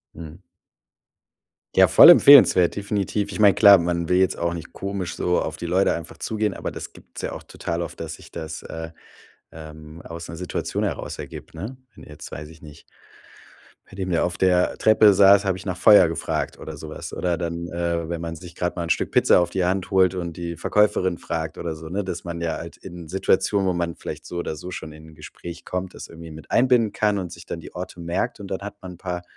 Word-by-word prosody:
Mhm. 80 Hz, +2 st, -10 dB, 1.3 s
Ja -, -, +7 dB
voll -, -, +9 dB
empfehlenswert, 125 Hz, -11 st, +7 dB
definitiv. 100 Hz, 0 st, -2 dB
Ich -, -, -6 dB
meine 100 Hz, -2 st, +6 dB
klar, 100 Hz, 0 st, +8 dB
man 85 Hz, -1 st, -2 dB
will 90 Hz, -, +3 dB
jetzt 95 Hz, 0 st, +2 dB
auch 85 Hz, 0 st, -1 dB
nicht 85 Hz, -2 st, -8 dB
komisch 100 Hz, -2 st, -4 dB
so 90 Hz, 0 st, +1 dB
auf -, -, -4 dB
die -, -, -7 dB
Leute 95 Hz, +3 st, +2 dB
einfach 85 Hz, -1 st, -6 dB
zugehen. 105 Hz, -2 st, -2 dB
Aber -, -, -5 dB
das -, -, -8 dB
gibt's -, -, -12 dB
ja -, -, -3 dB
auch -, -, -8 dB
total 85 Hz, 0 st, -5 dB
oft, 85 Hz, -, -6 dB
dass 80 Hz, 0 st, -5 dB
sich -, -, -15 dB
das, 80 Hz, -1 st, -7 dB
äh, 80 Hz, 0 st, -7 dB, 0.6 s
ähm, 80 Hz, 0 st, -11 dB
aus 85 Hz, 0 st, -8 dB
'ner -, -, -7 dB
Situation 90 Hz, +1 st, -3 dB
heraus -, -, -3 dB
ergibt, -, -, -10 dB
ne? 105 Hz, +11 st, -7 dB, 0.2 s
Wenn -, -, -14 dB
du -, -, -14 dB
jetzt, 75 Hz, -, -11 dB
weiß 75 Hz, 0 st, -7 dB
ich 80 Hz, -1 st, -15 dB
nicht 75 Hz, -1 st, -14 dB, 1.1 s
bei -, -, -13 dB
dem 95 Hz, -1 st, -4 dB
der 85 Hz, -, +1 dB
auf 90 Hz, 0 st, -3 dB
der 90 Hz, -1 st, +2 dB
Treppe 110 Hz, -1 st, +5 dB
saß, 100 Hz, +1 st, +6 dB
habe 95 Hz, -2 st, -1 dB
ich 95 Hz, -, -11 dB
nach 95 Hz, -2 st, -3 dB
Feuer 100 Hz, -4 st, +7 dB
gefragt 80 Hz, -1 st, -3 dB
oder -, -, -8 dB
sowas. -, -, -8 dB
Oder 90 Hz, -2 st, -1 dB
dann, 85 Hz, +1 st, -4 dB
äh, 85 Hz, -1 st, -2 dB
wenn 85 Hz, 0 st, -4 dB
man 85 Hz, 0 st, -5 dB
sich 85 Hz, +2 st, -12 dB
grad 90 Hz, 0 st, -2 dB
mal 85 Hz, -, -3 dB
'n 85 Hz, -, -6 dB
Stück -, -, 0 dB
Pizza -, -, +5 dB
auf 85 Hz, -, -1 dB
die 90 Hz, 0 st, -1 dB
Hand 95 Hz, +1 st, -1 dB
holt 95 Hz, -1 st, +4 dB
und 85 Hz, -2 st, -5 dB
die 85 Hz, -1 st, -5 dB
Verkäuferin 95 Hz, -2 st, +1 dB
fragt 80 Hz, -1 st, -4 dB
oder 85 Hz, -2 st, -4 dB
so, 80 Hz, 0 st, -10 dB
ne? 100 Hz, +4 st, -2 dB
Dass 90 Hz, -2 st, -5 dB
man 85 Hz, -1 st, -6 dB
ja 80 Hz, -2 st, -2 dB
halt 85 Hz, +1 st, -9 dB
in 90 Hz, -3 st, -10 dB
Situationen, 95 Hz, +2 st, +1 dB
wo 90 Hz, -, +1 dB
man 85 Hz, -1 st, -2 dB
vielleicht -, -, -8 dB
so 90 Hz, -, -7 dB
oder 85 Hz, -, -3 dB
so 90 Hz, +4 st, -8 dB
schon 80 Hz, -3 st, -7 dB
in 80 Hz, +1 st, -14 dB
'n 80 Hz, -, -16 dB
Gespräch 85 Hz, +2 st, -10 dB
kommt, 90 Hz, 0 st, -4 dB
das -, -, -9 dB
irgendwie 80 Hz, 0 st, -11 dB
mit 75 Hz, -2 st, -12 dB
einbinden 120 Hz, -3 st, +3 dB
kann 105 Hz, -1 st, +1 dB
und 90 Hz, -3 st, -4 dB
sich 85 Hz, -, -11 dB
dann 85 Hz, -, -6 dB
die -, -, -12 dB
Orte 90 Hz, 0 st, -7 dB
merkt. 90 Hz, +8 st, -2 dB
Und 100 Hz, -2 st, -8 dB
dann 95 Hz, -, -3 dB
hat 100 Hz, 0 st, -7 dB
man 95 Hz, -1 st, -8 dB
'n -, -, -14 dB
paar 90 Hz, 0 st, -5 dB
85 Hz, 235 wpm, -23 LUFS, 85-95 Hz, 1.3 s, voll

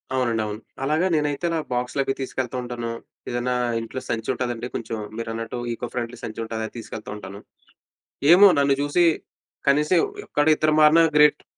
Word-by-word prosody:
అవునండవును. 110 Hz, -4 st, -1 dB, 0.2 s
అలాగ 155 Hz, +4 st, +1 dB
నేనైతే 150 Hz, +2 st, -1 dB
ఇలా 165 Hz, -, 0 dB, 0.2 s
బాక్సులవి 135 Hz, +2 st, -1 dB
తీసుకెళ్తా 130 Hz, -1 st, -3 dB
ఉంటాను. 120 Hz, -1 st, -4 dB, 0.4 s
ఏదన్నా 120 Hz, +1 st, -1 dB, 0.2 s
ఇంట్లో 115 Hz, +3 st, -6 dB
సంచుంటాదండి, 120 Hz, +1 st, -2 dB
కొంచెం 115 Hz, 0 st, -4 dB, 0.2 s
మీరన్నట్టు 115 Hz, +1 st, -4 dB
ఈకో 120 Hz, +1 st, -4 dB
ఫ్రెండ్లీ 120 Hz, 0 st, -4 dB
సంచుంటదది 110 Hz, 0 st, -4 dB
తీసుకెళ్తా 110 Hz, -1 st, -8 dB
ఉంటాను. 100 Hz, -1 st, -9 dB, 0.9 s
ఏమో 200 Hz, +3 st, +9 dB
నన్ను 140 Hz, -1 st, +3 dB
చూసి, 145 Hz, +5 st, +3 dB, 0.6 s
కనీసం 150 Hz, +5 st, +3 dB, 0.3 s
యొక్కడిద్దరు 155 Hz, +1 st, +2 dB
మారినా 160 Hz, +2 st, +7 dB
గ్రేట్. 150 Hz, 0 st, +5 dB
125 Hz, 125 wpm, -23 LUFS, 115-145 Hz, 0.9 s, ఏమో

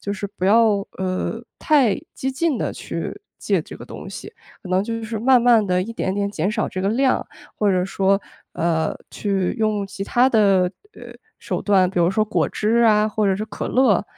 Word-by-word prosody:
就 200 Hz, -, -3 dB
是 200 Hz, 0 st, -4 dB
不 195 Hz, -2 st, -4 dB
要， 215 Hz, 0 st, +4 dB, 0.2 s
呃， 190 Hz, +5 st, -3 dB
太， 270 Hz, -9 st, +3 dB, 0.2 s
激 265 Hz, +1 st, -3 dB
进 295 Hz, 0 st, 0 dB
地 -, -, -2 dB
去 -, -, -6 dB, 0.2 s
戒 -, -, 0 dB
这 -, -, -11 dB
个 -, -, -10 dB
东 -, -, -9 dB
西， -, -, -9 dB, 0.3 s
可 185 Hz, -, -10 dB
能 185 Hz, +1 st, +2 dB
就 230 Hz, +1 st, -4 dB
是 220 Hz, -1 st, -4 dB
慢 255 Hz, +1 st, +5 dB
慢 235 Hz, -2 st, +5 dB
地 180 Hz, -2 st, +1 dB
一 230 Hz, +5 st, -6 dB
点 190 Hz, -4 st, -2 dB
点 200 Hz, 0 st, -1 dB
减 190 Hz, -1 st, -1 dB
少 215 Hz, 0 st, -1 dB
这 185 Hz, -, -5 dB
个 195 Hz, -, +1 dB
量， 260 Hz, +5 st, +1 dB, 0.3 s
或 210 Hz, -1 st, +1 dB
者 180 Hz, -1 st, +1 dB
说， 195 Hz, +1 st, +1 dB, 0.3 s
呃， 160 Hz, -1 st, 0 dB, 0.2 s
去 195 Hz, -3 st, -1 dB
用 215 Hz, -3 st, 0 dB
其 195 Hz, -, -7 dB
它 245 Hz, +5 st, +3 dB
的， 195 Hz, -6 st, +3 dB, 0.2 s
呃 -, -, -11 dB, 0.2 s
手 -, -, -4 dB
段， 190 Hz, -3 st, +3 dB
比 180 Hz, -1 st, -1 dB
如 170 Hz, +1 st, +3 dB
说 215 Hz, +2 st, +1 dB
果 215 Hz, -, 0 dB
汁 220 Hz, +2 st, 0 dB
啊， 215 Hz, -2 st, +4 dB
或 215 Hz, 0 st, -1 dB
者 190 Hz, -1 st, +2 dB
是 215 Hz, -, -3 dB
可 210 Hz, -1 st, -6 dB
乐， 245 Hz, -8 st, +3 dB
205 Hz, 225 characters per minute, -21 LUFS, 190-230 Hz, 0.3 s, 慢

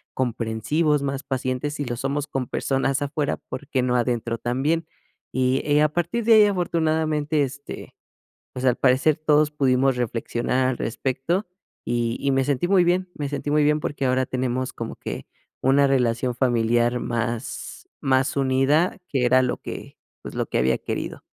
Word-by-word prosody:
comprensivos, 130 Hz, +5 st, 0 dB
más 135 Hz, -1 st, -2 dB
pacientes? 130 Hz, +2 st, -2 dB
Si 145 Hz, -, -3 dB
lo 120 Hz, -1 st, -3 dB
somos 140 Hz, +2 st, -2 dB
con 130 Hz, -4 st, -3 dB
personas 135 Hz, +1 st, 0 dB
afuera, 145 Hz, +1 st, -1 dB
¿por 145 Hz, -, -8 dB
qué 130 Hz, -4 st, 0 dB
no 125 Hz, -1 st, +1 dB
adentro 120 Hz, -1 st, 0 dB
también?" 150 Hz, +7 st, 0 dB, 0.4 s
Y, 130 Hz, +1 st, +1 dB
eh, 150 Hz, 0 st, +4 dB
a 155 Hz, -, +3 dB
partir 175 Hz, +7 st, -1 dB
de 230 Hz, -, +6 dB
ahí, 215 Hz, -1 st, +8 dB
afortunadamente, 160 Hz, -5 st, +1 dB
este, 140 Hz, +2 st, -7 dB, 0.6 s
pues 130 Hz, -, -5 dB
al 125 Hz, -, +3 dB
parecer 135 Hz, +4 st, +3 dB
todos 155 Hz, -1 st, +3 dB
pudimos 135 Hz, -2 st, +2 dB
reflexionar 120 Hz, +2 st, -1 dB
al 125 Hz, -, -2 dB
respecto 135 Hz, -, -1 dB, 0.4 s
y 120 Hz, -1 st, -1 dB
y 140 Hz, -, +1 dB
me 135 Hz, 0 st, +2 dB
sentí 145 Hz, +5 st, 0 dB
muy 190 Hz, -2 st, +5 dB
bien, 180 Hz, +2 st, +1 dB
me 145 Hz, -2 st, -3 dB
sentí 145 Hz, 0 st, -3 dB
muy 150 Hz, 0 st, +3 dB
bien 150 Hz, +1 st, +3 dB
porque 140 Hz, -2 st, -2 dB
ahora 130 Hz, 0 st, +1 dB
tenemos 130 Hz, 0 st, -2 dB
como 115 Hz, -1 st, -6 dB
que -, -, -6 dB, 0.3 s
una 140 Hz, +2 st, +4 dB
relación 125 Hz, -2 st, +1 dB
familiar 120 Hz, -1 st, +2 dB
más 115 Hz, +1 st, -4 dB
más 130 Hz, +1 st, +1 dB
unida 140 Hz, +7 st, +2 dB
que 130 Hz, -3 st, 0 dB
era 130 Hz, +1 st, +5 dB
lo 125 Hz, -, 0 dB
que, -, -, -8 dB, 0.2 s
pues, -, -, -8 dB
lo -, -, -1 dB
que -, -, -1 dB
había 65 Hz, +1 st, +2 dB
querido. -, -, -5 dB
135 Hz, 170 wpm, -24 LUFS, 125-150 Hz, 0.6 s, ahí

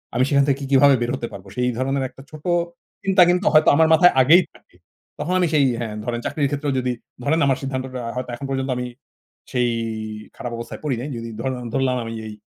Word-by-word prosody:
আমি 125 Hz, -, +3 dB
সেখান 140 Hz, -1 st, +4 dB
থেকে 140 Hz, -2 st, +2 dB
কি -, -, -3 dB
কিভাবে 140 Hz, 0 st, +6 dB
বের 120 Hz, 0 st, 0 dB
হতে 120 Hz, -3 st, -4 dB
পারব। 95 Hz, 0 st, -10 dB
সেই 125 Hz, 0 st, +1 dB
ধরনের 135 Hz, +1 st, 0 dB
একটা 135 Hz, -, -15 dB
ছোট 155 Hz, -1 st, -11 dB, 0.6 s
চিন্তা 195 Hz, -1 st, +4 dB
কিন্তু 180 Hz, +3 st, +1 dB
হয়তো 155 Hz, 0 st, +6 dB
আমার 160 Hz, +1 st, +5 dB
মাথায় 175 Hz, +2 st, +6 dB
আগেই 165 Hz, +8 st, +6 dB
থাকে। -, -, -23 dB, 0.4 s
তখন 180 Hz, -, -2 dB
আমি 180 Hz, -, +3 dB
সেই 145 Hz, -3 st, +4 dB
হ্যাঁ, 110 Hz, -3 st, -4 dB
ধরেন 120 Hz, -1 st, -2 dB
চাকরির 145 Hz, -2 st, 0 dB
ক্ষেত্রেও 145 Hz, -1 st, -1 dB
যদি 125 Hz, 0 st, -1 dB, 0.3 s
ধরেন 160 Hz, +4 st, +2 dB
আমার 135 Hz, -2 st, +2 dB
সিদ্ধান্তটা 130 Hz, -1 st, -4 dB
হয়তো 125 Hz, 0 st, -4 dB
এখন 135 Hz, -, -7 dB
পর্যন্ত 135 Hz, 0 st, -2 dB
আমি 125 Hz, -, -3 dB, 0.7 s
সেই 125 Hz, -2 st, +1 dB, 0.7 s
খারাপ 120 Hz, -, -5 dB
অবস্থায় 115 Hz, 0 st, -7 dB
পড়ি 145 Hz, -4 st, 0 dB
নাই। 140 Hz, -, -5 dB
যদি 115 Hz, 0 st, -6 dB
ধর 130 Hz, -, -1 dB, 0.2 s
ধরলাম 130 Hz, -2 st, +1 dB
আমি 115 Hz, 0 st, -6 dB
এই 110 Hz, -, -7 dB
135 Hz, 210 wpm, -22 LUFS, 125-145 Hz, 0.7 s, কিভাবে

